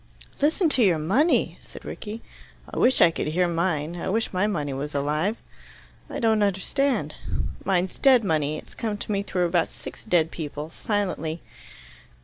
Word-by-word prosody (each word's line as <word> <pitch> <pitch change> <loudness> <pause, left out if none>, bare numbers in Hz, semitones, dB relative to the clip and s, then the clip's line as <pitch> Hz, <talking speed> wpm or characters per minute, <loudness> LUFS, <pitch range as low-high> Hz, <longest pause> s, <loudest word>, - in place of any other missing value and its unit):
"Listen 320 +5 +3
to 260 -5 +4
your 180 -6 +4
money!" 215 - +2
said - - -12
Rickie. 220 +2 -7 0.4
"I - - -5
wish 260 - +4
I 170 - +7
could - - -3
hear 175 +4 +2
mine. 170 -2 -1
I 170 - -3
wish 220 +2 0
my 185 +3 +2
money 150 -9 -2
was 145 +2 -4
alive." 150 +10 0 0.7
"I - - -5
don't 220 -2 +3
understand." 205 - 0 0.5
"Mine's 185 -1 0
dead 260 -4 +6
money. 155 -4 0
It's - - -11
come 215 -2 -3
to 210 - -5
me 200 -1 +1
through 180 -3 0
about 170 -1 +1
six - - -10
dead 170 -6 +2
people 150 0 -6
silently." 180 -7 -2
180 Hz, 165 wpm, -25 LUFS, 155-215 Hz, 0.7 s, I